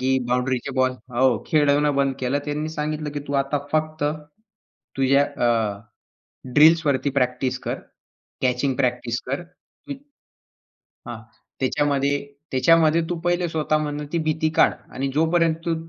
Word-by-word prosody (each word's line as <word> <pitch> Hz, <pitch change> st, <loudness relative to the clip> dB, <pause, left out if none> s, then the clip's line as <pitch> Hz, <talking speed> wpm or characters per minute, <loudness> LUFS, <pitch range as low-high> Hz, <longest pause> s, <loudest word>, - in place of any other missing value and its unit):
की 130 Hz, +1 st, +2 dB
बाउंडरीचे 125 Hz, +1 st, -1 dB
बॉल 130 Hz, 0 st, +2 dB, 0.2 s
हो 130 Hz, 0 st, +3 dB
खेळवणं 145 Hz, -1 st, +3 dB
बंद 135 Hz, -1 st, +1 dB
केलं. 130 Hz, +2 st, 0 dB
त्यांनी 150 Hz, +1 st, -3 dB
सांगितलं 150 Hz, -1 st, -3 dB
की 145 Hz, -, -4 dB
तू -, -, -3 dB
आता 140 Hz, +2 st, -2 dB
फक्त, 155 Hz, -1 st, -1 dB, 0.9 s
तुझ्या 135 Hz, +1 st, +4 dB, 0.2 s
अ, 110 Hz, -4 st, 0 dB, 0.7 s
ड्रिल्सवरती 150 Hz, -3 st, +4 dB
प्रॅक्टिस 130 Hz, -1 st, 0 dB
कर, -, -, -3 dB, 0.7 s
कॅचिंग 130 Hz, +1 st, +1 dB
प्रॅक्टिस 125 Hz, -3 st, -1 dB
कर 140 Hz, +6 st, -2 dB
की 180 Hz, +10 st, -12 dB, 1.1 s
हां. 120 Hz, -1 st, -6 dB, 0.4 s
त्याच्यामध्ये 140 Hz, +1 st, +1 dB, 0.4 s
त्याच्यामध्ये 160 Hz, +4 st, +4 dB
तू 175 Hz, -, -2 dB
पहिले 175 Hz, +1 st, 0 dB
स्वतःमधनं 150 Hz, -2 st, -1 dB
ती 170 Hz, -, +1 dB
भीती 155 Hz, 0 st, +1 dB
काढ. -, -, +5 dB, 0.2 s
आणि 135 Hz, +2 st, -2 dB
जोपर्यंत 165 Hz, +1 st, +2 dB
तू 170 Hz, -, 0 dB
145 Hz, 130 wpm, -23 LUFS, 130-155 Hz, 1.1 s, काढ